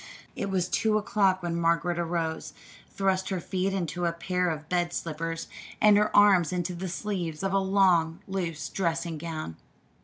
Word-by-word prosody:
It 195 Hz, -, -3 dB
was 185 Hz, -2 st, 0 dB
two 215 Hz, +3 st, +1 dB
o'clock 195 Hz, -3 st, +1 dB
when 170 Hz, -1 st, -2 dB
Margaret 170 Hz, +1 st, +1 dB
arose, 165 Hz, -1 st, -2 dB, 0.4 s
thrust 190 Hz, -1 st, 0 dB
her 190 Hz, -2 st, -1 dB
feet 185 Hz, +2 st, -1 dB
into 180 Hz, -2 st, -2 dB
a -, -, +1 dB
pair 180 Hz, +1 st, -1 dB
of 155 Hz, -1 st, -5 dB
bed 175 Hz, 0 st, 0 dB
slippers 165 Hz, +1 st, -4 dB, 0.3 s
and 210 Hz, -1 st, +6 dB
her 210 Hz, +1 st, +3 dB
arms 195 Hz, -5 st, +6 dB
into 180 Hz, 0 st, -2 dB
the 180 Hz, +2 st, -5 dB
sleeves 175 Hz, -4 st, -3 dB
of 195 Hz, 0 st, 0 dB
a 195 Hz, -, +4 dB
long, 185 Hz, -4 st, +3 dB
loose 175 Hz, -5 st, -3 dB
dressing 165 Hz, -3 st, -2 dB
gown. 155 Hz, -, -5 dB
175 Hz, 165 wpm, -27 LUFS, 165-195 Hz, 0.4 s, and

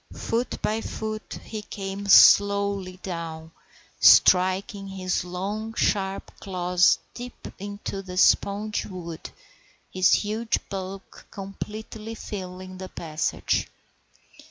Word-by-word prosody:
Foot 235 Hz, +2 st, -2 dB
by 220 Hz, +1 st, 0 dB
foot 215 Hz, -1 st, -5 dB
he 215 Hz, -1 st, -6 dB
came 200 Hz, -1 st, -6 dB
slowly 200 Hz, -2 st, +6 dB
down, 165 Hz, -3 st, -6 dB, 0.5 s
striking 190 Hz, +2 st, +5 dB
his 185 Hz, -2 st, -2 dB
long, 205 Hz, +5 st, -4 dB
sharp 195 Hz, -1 st, 0 dB
claws 180 Hz, -1 st, +3 dB, 0.2 s
deep 245 Hz, 0 st, -8 dB
into 200 Hz, 0 st, -5 dB
the 180 Hz, -1 st, -8 dB
spongy 205 Hz, +2 st, +2 dB
wood, 170 Hz, -4 st, -7 dB, 0.6 s
his 185 Hz, 0 st, +4 dB
huge 220 Hz, +2 st, +1 dB
bulk 195 Hz, 0 st, -7 dB
completely 215 Hz, +3 st, -7 dB
filling 185 Hz, -3 st, -7 dB
the 185 Hz, 0 st, -7 dB
passage. 155 Hz, -2 st, -1 dB
195 Hz, 100 wpm, -25 LUFS, 185-210 Hz, 0.6 s, slowly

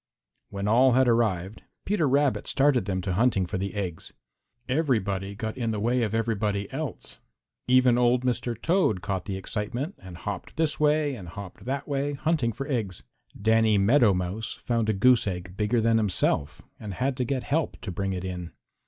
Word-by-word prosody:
When 100 Hz, 0 st, -4 dB
all 125 Hz, +4 st, +5 dB
had 130 Hz, +1 st, +4 dB
arrived, 110 Hz, -4 st, +1 dB, 0.2 s
Peter 180 Hz, -8 st, +1 dB
Rabbit 140 Hz, 0 st, +1 dB
started 135 Hz, -6 st, +2 dB
them 95 Hz, -2 st, -2 dB
to 90 Hz, 0 st, -2 dB
hunting 100 Hz, -2 st, +2 dB
for 90 Hz, +1 st, -4 dB
the 100 Hz, +2 st, -4 dB
eggs. 90 Hz, -5 st, -4 dB, 0.6 s
Everybody 100 Hz, -9 st, 0 dB
got 110 Hz, +1 st, -4 dB
in 120 Hz, -3 st, -2 dB
the 110 Hz, -2 st, -1 dB
way 120 Hz, +4 st, +1 dB
of 110 Hz, -1 st, -1 dB
everybody 105 Hz, -3 st, -1 dB
else. 150 Hz, +1 st, -5 dB, 0.5 s
Even 125 Hz, -1 st, +5 dB
old 125 Hz, +1 st, +3 dB
Mr. 120 Hz, -2 st, -1 dB
Toad 170 Hz, -, +1 dB
caught 95 Hz, -3 st, -2 dB
the 95 Hz, -2 st, -3 dB
excitement 120 Hz, -, -3 dB
and 95 Hz, -2 st, -10 dB
hopped 100 Hz, -, -6 dB
this 155 Hz, -2 st, 0 dB
way 150 Hz, -1 st, +2 dB
and 100 Hz, -9 st, -8 dB
hopped 100 Hz, +2 st, -9 dB
that 135 Hz, +2 st, -3 dB
way 145 Hz, 0 st, -1 dB
hunting 145 Hz, -4 st, 0 dB
for 135 Hz, +5 st, -6 dB
eggs. 110 Hz, -, -3 dB, 0.4 s
Danny 110 Hz, 0 st, +3 dB
Meadow 110 Hz, +3 st, +5 dB
Mouse 90 Hz, +4 st, -2 dB
found 115 Hz, -2 st, -1 dB
a -, -, +3 dB
goose 120 Hz, +3 st, +4 dB
egg 90 Hz, -1 st, -5 dB
bigger 105 Hz, +4 st, +1 dB
than 115 Hz, 0 st, +3 dB
himself 90 Hz, -8 st, 0 dB, 0.2 s
and 100 Hz, -3 st, -6 dB
had 130 Hz, +4 st, 0 dB
to 130 Hz, -, 0 dB
get 130 Hz, +1 st, -2 dB
help 160 Hz, +1 st, -1 dB
to 105 Hz, -, -5 dB
bring 95 Hz, +2 st, -2 dB
it 95 Hz, 0 st, -4 dB
in. 90 Hz, -2 st, -6 dB
115 Hz, 185 wpm, -26 LUFS, 100-130 Hz, 0.6 s, all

